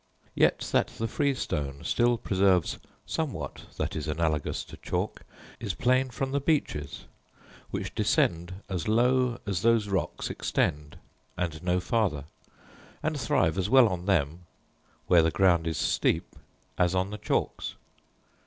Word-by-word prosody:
Yet -, -, +3 dB
that -, -, +3 dB
the 115 Hz, -, -1 dB
freestone 75 Hz, -, -2 dB
still 120 Hz, 0 st, +2 dB
preserves 95 Hz, -4 st, +2 dB, 0.3 s
somewhat 130 Hz, -, -4 dB
that -, -, -2 dB
is 80 Hz, -, -3 dB
analogous 75 Hz, -1 st, -1 dB
to -, -, -12 dB
chalk, -, -, -3 dB, 0.4 s
is 105 Hz, -5 st, -3 dB
plain 130 Hz, +1 st, +2 dB
from 135 Hz, +2 st, -3 dB
the 140 Hz, -, +1 dB
beeches 135 Hz, -, -1 dB, 0.6 s
which -, -, -4 dB
descend 85 Hz, +3 st, 0 dB
as 90 Hz, -5 st, -3 dB
low 125 Hz, +2 st, +3 dB
as 95 Hz, -4 st, -1 dB
those 115 Hz, -2 st, +3 dB
rocks 95 Hz, -1 st, -2 dB
extend, 75 Hz, 0 st, -1 dB, 0.4 s
and 85 Hz, -3 st, -2 dB
no 90 Hz, 0 st, +1 dB
farther, 90 Hz, -, 0 dB, 0.8 s
and -, -, -1 dB
thrive 80 Hz, +4 st, +2 dB
as 95 Hz, +2 st, 0 dB
well 130 Hz, -1 st, +7 dB
on 90 Hz, 0 st, -4 dB
them, 85 Hz, -2 st, 0 dB, 0.6 s
where 85 Hz, -2 st, +6 dB
the 80 Hz, -, +3 dB
ground 85 Hz, -2 st, +3 dB
is 80 Hz, -, -1 dB
steep, -, -, 0 dB, 0.4 s
as 90 Hz, 0 st, +3 dB
on 95 Hz, +2 st, 0 dB
the 105 Hz, -, -6 dB
chalks. 105 Hz, -, -2 dB
95 Hz, 140 wpm, -28 LUFS, 80-115 Hz, 0.8 s, well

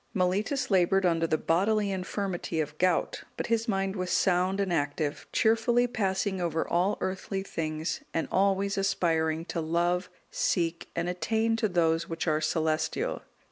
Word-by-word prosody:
Mellitus 205 Hz, +8 st, 0 dB
laboured 190 Hz, 0 st, +3 dB
under 165 Hz, -1 st, +2 dB
the 155 Hz, -, +1 dB
bodily 200 Hz, +6 st, +1 dB
infirmity 185 Hz, -2 st, -3 dB
of 155 Hz, -1 st, -2 dB
gout, 185 Hz, 0 st, +1 dB, 0.2 s
but -, -, -2 dB
his 230 Hz, +1 st, 0 dB
mind 195 Hz, -2 st, 0 dB
was 185 Hz, -2 st, -3 dB
sound 185 Hz, +1 st, +2 dB
and 195 Hz, -3 st, 0 dB
active, 145 Hz, -1 st, -2 dB
cheerfully 230 Hz, +2 st, +3 dB
passing 195 Hz, -5 st, -1 dB
over 165 Hz, -2 st, -1 dB
all 180 Hz, +4 st, +1 dB
earthly 190 Hz, +1 st, -3 dB
things, 155 Hz, -3 st, -3 dB
and 165 Hz, -, -1 dB
always 195 Hz, +1 st, +2 dB
aspiring 165 Hz, -4 st, +1 dB
to 170 Hz, -, -3 dB
love, 175 Hz, +3 st, 0 dB, 0.2 s
seek, 170 Hz, -2 st, -1 dB
and 170 Hz, +1 st, -1 dB
attain 220 Hz, +6 st, 0 dB
to 220 Hz, -2 st, +1 dB
those 165 Hz, -2 st, +1 dB
which 165 Hz, -1 st, -3 dB
are 155 Hz, 0 st, +2 dB
celestial. 155 Hz, 0 st, -1 dB
180 Hz, 150 wpm, -28 LUFS, 165-195 Hz, 0.2 s, laboured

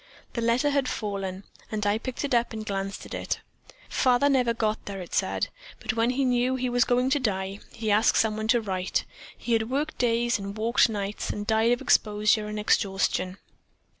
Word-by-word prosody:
The 235 Hz, -, -2 dB
letter 235 Hz, +5 st, +2 dB
had 280 Hz, -2 st, +1 dB
fallen, 195 Hz, -2 st, -4 dB, 0.3 s
and 210 Hz, -1 st, -2 dB
I 205 Hz, +2 st, +2 dB
picked 255 Hz, +3 st, -4 dB
it 275 Hz, -, -2 dB
up 235 Hz, -1 st, +2 dB
and 220 Hz, -1 st, -5 dB
glanced 195 Hz, -1 st, -4 dB
at -, -, -9 dB
it. -, -, -2 dB, 0.5 s
Father 255 Hz, +2 st, +3 dB
never 255 Hz, -4 st, +3 dB
got 220 Hz, -2 st, -1 dB
there, 200 Hz, -1 st, -5 dB
it 180 Hz, -, -9 dB
said, -, -, 0 dB, 0.3 s
but -, -, -2 dB
when 230 Hz, +1 st, +2 dB
he 265 Hz, +2 st, +1 dB
knew 250 Hz, +1 st, +2 dB
he 255 Hz, -1 st, -1 dB
was 245 Hz, -1 st, +3 dB
going 250 Hz, +2 st, +2 dB
to 290 Hz, -, +3 dB
die 195 Hz, -4 st, -2 dB
he 220 Hz, -2 st, -2 dB
asked 215 Hz, +2 st, +4 dB
someone 215 Hz, 0 st, +1 dB
to 240 Hz, 0 st, +3 dB
write. 190 Hz, -3 st, -1 dB, 0.3 s
He 235 Hz, -, -2 dB
had 225 Hz, 0 st, +1 dB
worked 290 Hz, +4 st, -2 dB
days 235 Hz, -1 st, +2 dB
and 200 Hz, +1 st, -6 dB
walked 230 Hz, +2 st, +3 dB
nights 205 Hz, -1 st, -3 dB
and 205 Hz, -, -3 dB
died 220 Hz, +2 st, +3 dB
of 245 Hz, -, +1 dB
exposure 210 Hz, 0 st, +2 dB
and 210 Hz, 0 st, -5 dB
exhaustion. 195 Hz, -2 st, +1 dB
225 Hz, 195 wpm, -26 LUFS, 205-245 Hz, 0.5 s, asked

